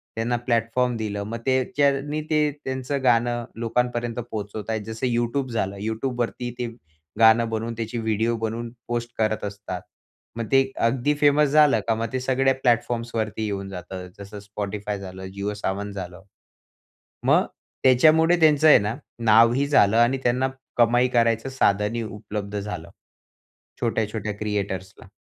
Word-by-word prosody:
त्यांना 115 +2 0
प्लॅटफॉर्म 120 +1 +1
दिलं. 105 -2 -3
मग 110 +3 -5
त्याच्यानी 140 +1 +1
ते 155 -1 +3 0.2
त्यांचं 130 +1 -3
गाणं 120 -1 +2
लोकांपर्यंत 120 0 -1 0.2
पोहोचवताय. 110 +1 -4
जसं 110 +3 -4
YouTube 120 +3 0
झालं. 100 -4 -1
YouTubeवरती 120 +2 -2
ते 120 - -1 0.5
गाणं 115 +1 +6
बनवून 115 +1 -3
त्याची 115 +1 -4
व्हिडिओ 110 +1 0
बनवून 115 +1 -3 0.2
पोस्ट 120 0 -2
करत 110 -1 0
असतात. 100 -3 -6 0.6
मग 115 - -2
ते 135 0 +4
अगदी 130 +5 +1
फेमस 145 0 +5
झालं 150 -5 +5
का 115 - +2
मग 115 +1 -2
ते 130 - 0
सगळ्या 135 +1 +2
प्लॅटफॉर्म्स 120 -2 0
वरती 110 0 -2
येऊन 100 -2 -4
जातं, 90 0 -7
जसं 100 +1 -9
Spotify 105 0 -4
झालं, 95 -1 -8
जिओ 100 +1 -3
सावन 100 0 -3
झालं. 95 -2 -7 1.0
मग - - +4 0.4
त्याच्यामुळे 160 +6 +5
त्यांचं 155 -1 +5
आहे 150 - +8
ना 105 +3 -2 0.3
नावही 115 +5 +5
झालं 115 -7 +4
आणि 120 +3 +4
त्यांना 125 +2 +2 0.3
कमाई 120 +1 +4
करायचं 115 +2 +2
साधनही 110 -2 +1
उपलब्ध 105 -1 -5
झालं. 100 -5 -6 0.9
छोट्या-छोट्या 110 -2 -1
क्रिएटर्सला. 100 -3 -4
115 Hz, 140 wpm, -24 LUFS, 105-125 Hz, 1.0 s, आहे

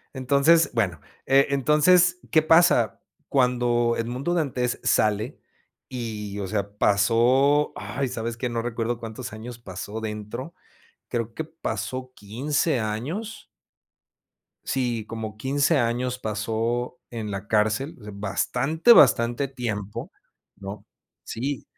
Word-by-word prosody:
Entonces, 140 +6 +4
bueno, 95 -9 0 0.3
eh, 135 +1 +5
entonces, 155 +6 +4
¿qué 160 - +5
pasa 160 -8 +4 0.3
cuando 120 -2 +2
Edmundo 125 +8 -2
Dantés 130 -7 -1
sale?, 110 +5 +1 0.5
y 110 -5 -5
o 100 - -3
sea, 100 0 -2
pasó, 120 +9 +3
ay, 135 +3 -3
sabes 115 -1 -4
que 125 - -2
no 120 -1 -2
recuerdo 115 0 -2
cuántos 115 +2 -7
años 115 +2 -8
pasó 105 0 -7
dentro, 110 +7 -6 0.6
creo 115 -2 -3
que 160 - -3
pasó 130 -5 -5
15 135 +7 -1
años 140 - -4 1.2
sí, 120 -4 -1
como 110 -1 -6
15 140 +6 +2
años 125 +1 -1
pasó 115 +3 -2
en 110 -3 -5
la 100 +1 -5
cárcel 110 +8 +1 0.2
bastante, 125 - +2
bastante 120 - +4
tiempo, 105 -6 -5 0.4
¿no? 100 +1 -8 0.4
Sí. 135 +4 -4
120 Hz, 115 wpm, -25 LUFS, 110-140 Hz, 1.2 s, eh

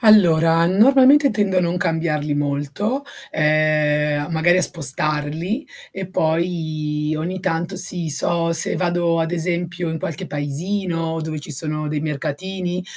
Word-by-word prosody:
Allora 170 -7 +5
normalmente 265 - +5
tendo 200 -3 +1
a - - +3
non 175 0 -1
cambiarli 160 -4 -1
molto, 145 - -2 0.3
ehm 150 -1 +2 0.2
magari 170 +3 +3
a 185 - +2
spostarli 155 - -1 0.2
e 190 -1 -6
poi 155 -3 -1
ogni 180 +4 -4
tanto 175 +1 -2
si 180 -2 +1
so 165 +3 +1
se - - 0
vado 175 -2 0
ad 165 +1 -1
esempio 170 0 -2
in 160 - -3
qualche 155 -1 -5
paesino 165 +3 -2
dove 155 -1 -4
ci 145 - -9
sono 155 +1 -3
dei 150 0 -2
mercatini, 175 +5 -3
165 Hz, 135 wpm, -20 LUFS, 155-180 Hz, 0.3 s, Allora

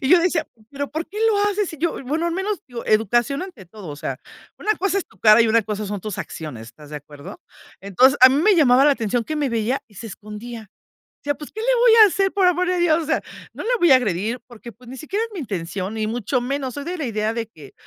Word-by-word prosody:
Y 265 - -1
yo 360 - +7
decía: 335 -2 +1 0.3
"¿Pero 285 0 -5
por 315 +2 -4
qué 410 - -13
lo 415 - +1
haces? 410 -1 -1
Si 320 - -9
yo", 335 +3 0
bueno 310 +6 -1
al 340 - -1
menos 385 +1 -2
yo 240 -2 -7
educación 240 - +1
ante 360 - -10
todo. 195 0 -11
O 145 - -7
sea, 150 - -5 0.4
una 430 - +1
cosa 395 +1 0
es - - -5
tu - - -25
cara 215 +1 +7
y 230 - +2
una 230 0 +3
cosa 210 0 -4
son 205 -1 -4
tus 210 0 -6
acciones. 130 -8 -7
¿Estás 145 +6 -15
de 150 - -5
acuerdo? 145 0 -11 0.4
Entonces 250 +8 +3
a 255 - +10
mí 275 +4 +1
me 420 +2 +5
llamaba 270 -3 +5
la 295 - +6
atención 235 -2 -1
que 310 - -4
me 290 -2 0
veía 235 +3 -1
y 210 - -22
se 225 - -8
escondía. 215 +2 -9 0.6
Decía: 290 0 0
"Pues, 295 - -9
¿qué 440 - -7
le - - +2
voy 480 -1 +5
a - - +7
hacer?, 390 +1 0
por 385 -2 +2
amor 360 0 +2
a 365 - 0
Dios". 335 -1 +2
O - - -7
sea, 320 - +1 0.3
no - - -7
le - - -3
voy 345 - +4
a 260 - +9
agredir 220 +1 -2
porque, 240 -1 -12
pues, 245 +1 -18
ni 260 - -8
siquiera 400 - -3
es 460 - -9
mi 375 - -6
intención 195 - -4
ni 215 -1 -2
mucho 240 +3 -1
menos. 265 0 -3
Soy 285 - -6
de 355 0 -5
la 290 - -3
idea 215 -1 -1
de 230 -1 -3
que 150 -9 -15
255 Hz, 270 wpm, -21 LUFS, 215-335 Hz, 0.6 s, a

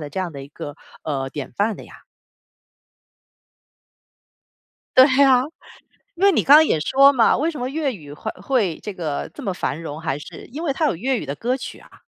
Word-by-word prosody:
的 145 -1 -7
这 190 - -5
样 180 -3 -3
的 140 -1 -8
一 140 - -11
个， 145 -1 -8 0.3
呃， 135 -3 -3
典 145 -1 -7
范 210 +1 0
的 - - -11
呀。 - - -16 2.9
对 260 - +10 0.2
啊， 255 -2 +5 0.7
因 370 - -4
为 400 - +7
你 - - +1
刚 285 - +8
刚 315 +1 +7
也 155 - +1
说 275 - +5
嘛， 240 -4 +4
为 315 +5 0
什 300 - -8
么 250 - -2
粤 285 -3 -1
语 145 -7 -11
会 - - -5
会 200 - 0
这 210 - -6
个 155 -5 -4
这 - - -9
么 195 - -2
繁 165 -2 -3
荣， 155 -1 -6
还 145 -4 -2
是 150 - -11
因 290 +7 -7
为 300 - 0
它 310 +3 0
有 - - 0
粤 250 +6 -1
语 - - -6
的 140 - -4
歌 250 - -1
曲 250 - -8
啊。 - - -19
210 Hz, 230 characters per minute, -21 LUFS, -, 2.9 s, 对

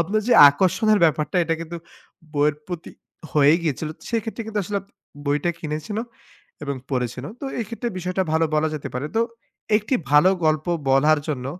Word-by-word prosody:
আপনার 195 +6 +1
যে - - +5 0.2
আকর্ষণের 190 +8 +2
ব্যাপারটা 150 0 +1
এটা 165 - 0
কিন্তু 165 +1 -6 0.6
বইয়ের 145 0 +2
প্রতি 175 -3 -6 0.4
হয়েই 150 +2 +5
গিয়েছিল। 155 0 -2 0.2
সেইক্ষেত্রে 230 0 -3
কিন্তু 220 -1 -3
আসলে 200 +2 -2 0.5
বইটা 145 +4 +1
কিনেছেন 155 +6 -5
ও - - -8 0.6
এবং 140 -1 -3
পড়েছেন 125 -1 -2
ও। - - -8
তো - - -6
এই 230 - -1
ক্ষেত্রে 235 +1 -4
বিষয়টা 180 +1 -1
ভালো 160 +1 +3
বলা 155 +1 +2
যেতে 150 - -5
পারে। 125 +4 -2
তো - - +4 0.6
১ 210 - -1
টি - - +2 0.2
ভালো 150 +6 +6
গল্প 155 0 +1 0.2
বলার 145 +3 +4
জন্য 130 -4 -3
160 Hz, 175 wpm, -23 LUFS, 150-190 Hz, 0.6 s, ভালো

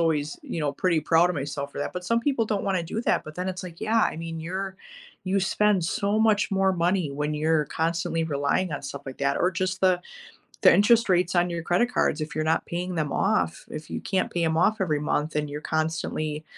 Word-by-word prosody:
always, 155 -3 0
you - - -5
know, 145 -2 0
pretty 170 +3 +1
proud 165 +3 +4
of 175 - -3
myself 140 0 -4
for - - -7
that. 145 - -3
But 180 - -4
some 230 +5 +2
people 260 -3 +1
don't 210 -2 -1
wanna 190 -3 0
do 175 +7 -4
that, - - +1
but 155 - -9
then 180 +1 -2
it's 185 0 -4
like, 175 -2 -9
Yeah, 220 +1 +2
I 210 - +1
mean, 165 0 -5
you're 190 +3 -4 0.5
you 195 +1 +2
spend 195 0 +2
so 200 +5 0
much 215 -1 +3
more 195 -1 +2
money 175 -2 +1
when 150 +2 -2
you're 155 0 +2
constantly 165 +1 -1
relying 150 +4 0
on 145 - -4
stuff 140 0 -6
like 130 - -7
that 140 0 +1
or 180 - +2
just 185 +1 -2
the 185 -1 +4 0.6
the - - +8
interest 230 +2 +4
rates 180 0 +2
on 175 0 +2
your 170 -1 -3
credit 185 +9 +1
cards 155 - +1
if 155 - -5
you're 155 - 0
not 160 +1 +1
paying 180 +1 -3
them 150 -3 -1
off 85 -2 0
if 155 0 -7
you - - -3
can't 190 -1 -1
pay 175 - 0
'em 160 0 +1
off 210 +5 +2
every 155 -5 +1
month 150 +1 -1
and 150 -1 -1
you're 145 +1 -5
constantly 155 -1 -2
170 Hz, 235 wpm, -26 LUFS, 155-190 Hz, 0.6 s, the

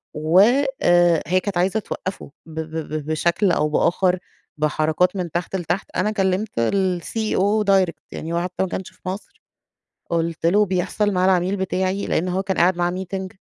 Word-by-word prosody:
و 155 +4 +3 0.4
آآ، 175 -2 +4
هي 185 +3 +3
كانت 200 -3 -3
عايزة 190 +5 +2
توقّفه 190 -6 -6
ب 160 0 -7
ب 155 -1 -5
بشكل 170 +5 +1
أو 150 - +1
بآخر، 180 +4 +2 0.4
بحركات 155 +4 +1
من 180 -4 -3
تحت 175 +2 -3
لتحت، 175 +1 -2
أنا 215 - +1
كلّمت 195 0 0
الCEO 195 - 0
direct 190 -3 +2
يعني 165 +1 -5
هو 170 - +1
حتّى 180 +1 -2
ماكانش 190 0 -4
في - - -29
مصر، 195 +3 -8 0.7
قُلت 165 -1 -1
له: 205 +5 +4
"بيحصل 190 +2 0
مع 185 0 +2
العميل 185 +1 +2
بتاعي" 190 +1 -1
لإن 175 - 0
هو 190 +2 -1
كان 190 -2 -2
قاعد 175 +1 +3
معاه 175 0 +1
meeting، 190 +1 -4
180 Hz, 165 wpm, -22 LUFS, 170-190 Hz, 0.7 s, آآ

